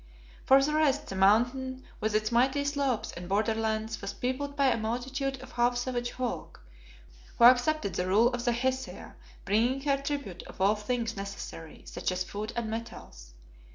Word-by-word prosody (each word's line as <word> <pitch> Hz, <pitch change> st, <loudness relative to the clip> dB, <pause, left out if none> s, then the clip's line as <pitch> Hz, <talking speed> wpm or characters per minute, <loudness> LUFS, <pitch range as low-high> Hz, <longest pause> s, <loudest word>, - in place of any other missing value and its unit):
For 270 Hz, +1 st, +6 dB
the 300 Hz, +2 st, 0 dB
rest, 295 Hz, -2 st, +2 dB
the 195 Hz, -, -4 dB
Mountain 245 Hz, +7 st, +2 dB, 0.2 s
with 215 Hz, 0 st, -1 dB
its 215 Hz, +1 st, +1 dB
mighty 265 Hz, +4 st, +2 dB
slopes 280 Hz, -5 st, -1 dB
and 175 Hz, +1 st, -8 dB
borderlands 220 Hz, +1 st, 0 dB
was 200 Hz, -, -4 dB
peopled 280 Hz, +3 st, -3 dB
by 280 Hz, -2 st, +3 dB
a -, -, +2 dB
multitude 255 Hz, +4 st, -2 dB
of -, -, -12 dB
half 240 Hz, 0 st, +2 dB
savage 245 Hz, -1 st, -2 dB
folk, 255 Hz, -1 st, -4 dB, 0.8 s
who -, -, +3 dB
accepted 250 Hz, -1 st, +5 dB
the 180 Hz, -, -1 dB
rule 215 Hz, +6 st, +5 dB
of 245 Hz, -1 st, -4 dB
the 240 Hz, -, +2 dB
Hesea, 260 Hz, +2 st, -3 dB, 0.3 s
bringing 235 Hz, +7 st, +2 dB
her 280 Hz, -1 st, +2 dB
tribute 280 Hz, -11 st, -4 dB
of -, -, -13 dB
all 195 Hz, +2 st, +4 dB
things 225 Hz, +2 st, -2 dB
necessary, 195 Hz, -5 st, -7 dB
such -, -, -3 dB
as 185 Hz, 0 st, -1 dB
food 210 Hz, +4 st, -5 dB
and 235 Hz, -2 st, -2 dB
metals. 220 Hz, -, -8 dB
240 Hz, 170 wpm, -29 LUFS, 215-265 Hz, 0.8 s, For